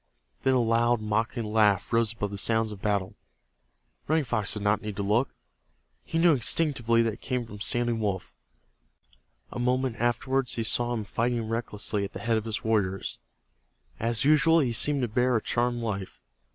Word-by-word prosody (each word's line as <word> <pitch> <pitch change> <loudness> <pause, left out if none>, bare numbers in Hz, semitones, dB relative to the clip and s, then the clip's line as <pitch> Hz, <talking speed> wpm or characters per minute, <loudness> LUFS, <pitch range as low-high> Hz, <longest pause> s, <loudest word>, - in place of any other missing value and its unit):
Then 130 0 +2
a - - +3
loud 120 0 +2
mocking 110 +3 -1
laugh 105 -1 +2
rose 115 -1 +3
above 105 -3 -4
the 100 - -5
sounds 110 +1 +1
of 100 -2 -9
battle. 100 -3 -1 0.9
Running 155 +1 +2
Fox 110 -6 -1
did 105 - -5
not 105 +1 +2
need 105 -2 -5
to 100 - -3
look. 110 +6 +1 0.7
He 165 - -3
knew 165 0 +5
instinctively 120 -3 +2
that 115 -1 0
it - - -13
came 125 -2 -2
from 105 -2 -11
Standing 120 +2 0
Wolf. 100 -4 -3 1.2
A - - -5
moment 125 -1 0
afterward 120 +2 0
he 115 - -2
saw 120 +2 +2
him 110 - -3
fighting 115 +2 -1
recklessly 110 -2 -2
at 100 - -5
the - - -6
head 115 -1 +1
of 110 - -10
his 110 -1 -3
warriors. 100 -4 -1 0.8
As 115 +1 +1
usual 155 +2 +5
be 125 -4 0
seemed 140 +3 +2
to - - +1
bear 125 +3 +1
a 110 - +1
charmed 120 0 0
life. 100 -4 -4
115 Hz, 180 wpm, -27 LUFS, 105-125 Hz, 1.2 s, knew